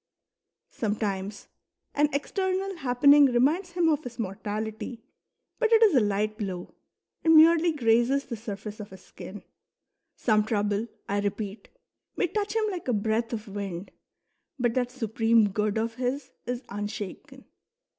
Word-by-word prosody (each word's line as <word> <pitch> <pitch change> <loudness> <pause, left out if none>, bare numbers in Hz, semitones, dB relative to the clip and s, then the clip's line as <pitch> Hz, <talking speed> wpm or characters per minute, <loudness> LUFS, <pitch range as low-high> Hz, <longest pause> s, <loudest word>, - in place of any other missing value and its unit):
Sometimes 205 -2 -3 0.5
an 295 +1 +3
external 375 +5 -1
happening 280 +1 +6
reminds 295 +9 +1
him 345 -2 +2
of 305 -3 +2
his 240 -1 -8
mortality, 220 +3 -4 0.6
but 460 -2 +2
it 455 0 +6
is 420 -5 +6
a 260 - +6
light 210 +1 0
blow, 185 -4 -5 0.5
and 325 0 +6
merely 330 +2 +7
grazes 245 0 +2
the 235 - -5
surface 210 -1 -7
of 210 - -7
his 190 - -13
skin." 205 +2 -10 0.7
Some 215 -2 +2
trouble, 210 0 0 0.2
I 200 +1 0
repeat, 205 +1 -4 0.5
may - - +1
touch 410 +4 -2
him 445 -1 +2
like 360 -6 -6
a 250 - +2
breath 220 +2 0
of 225 -1 -5
wind, 195 -2 -5 0.7
but 240 -3 +1
that 245 -1 0
Supreme 225 -3 +2
Good 210 +1 -1
of 225 +1 -1
his 255 +2 -3 0.2
is 245 +1 -3
unshaken. 205 -1 -6
230 Hz, 145 wpm, -27 LUFS, 210-285 Hz, 0.7 s, merely